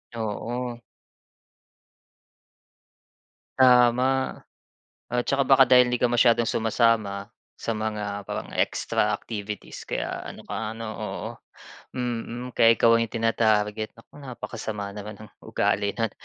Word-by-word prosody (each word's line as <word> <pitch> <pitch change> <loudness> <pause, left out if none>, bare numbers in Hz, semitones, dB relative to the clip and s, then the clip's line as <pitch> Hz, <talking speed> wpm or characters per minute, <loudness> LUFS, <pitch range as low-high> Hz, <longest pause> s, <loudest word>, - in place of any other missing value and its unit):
Oo. 120 +2 -4 2.8
Tama 125 +1 +4 0.7
at 120 0 -1
tsaka 140 0 +2
baka 135 0 +6
dahil 125 0 +6
'di 125 - 0
ka 125 - +3
masyadong 120 -1 +3
sumasama 110 -3 +1 0.3
sa 115 - -2
mga 105 -2 -3
parang - - -5
extra - - +1
activities 105 -2 -6
kaya - - -4
ano - - -14
ka - - -4 0.2
ano, 115 0 -7
oo - - -5 0.6
mm, 120 0 -4
kaya 115 0 +6
ikaw 115 0 +6
ang 115 -1 0
tinarget. 110 -2 +1
Naku, 115 - -19
napakasama 110 -5 -6
naman 105 0 -8
ng 110 - -11
ugali 100 0 0
no'n. 115 -3 -1
115 Hz, 115 wpm, -25 LUFS, 105-125 Hz, 2.8 s, baka